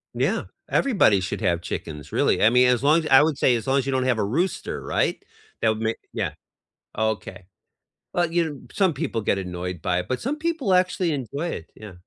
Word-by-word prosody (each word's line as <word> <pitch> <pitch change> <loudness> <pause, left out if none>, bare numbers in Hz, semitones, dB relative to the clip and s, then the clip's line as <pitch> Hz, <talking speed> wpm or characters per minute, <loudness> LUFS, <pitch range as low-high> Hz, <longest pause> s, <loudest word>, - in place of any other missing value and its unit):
Yeah, - - 0 0.2
everybody 195 - +3
should 95 - -4
have 85 0 +1
chickens, 75 -4 -6
really, - - +2
I 110 - +7
mean, 125 +1 +5
as 125 +1 +2
long 155 +3 +5
as 155 - -4
I 135 - +7
would 150 -2 +1
say 125 - +3
as 115 +2 -4
long 135 +1 +3
as 135 - 0
you 135 - -1
don't 130 -1 0
have 125 -3 +2
a 105 - 0
rooster, 165 - -2
right? - - -1 0.4
That 115 - +3
would 110 0 -1
ma 110 0 +1 0.2
Yeah, - - -2 0.6
oh 110 0 +1
okay. 95 -3 -7 0.7
Well, 175 -2 +1
you 170 0 +2
know 140 -3 -9
some 190 -5 +2
people 115 -4 -2
get 100 - +1
annoyed 90 -2 -5
by 90 0 +1
it, 90 - -5
but 130 - -1
some 285 +5 -2
people 310 - 0
actually 180 -2 +2
enjoy 140 +4 -3
it, 80 - -7
yeah. 105 -3 -10
125 Hz, 225 wpm, -24 LUFS, 100-165 Hz, 0.7 s, I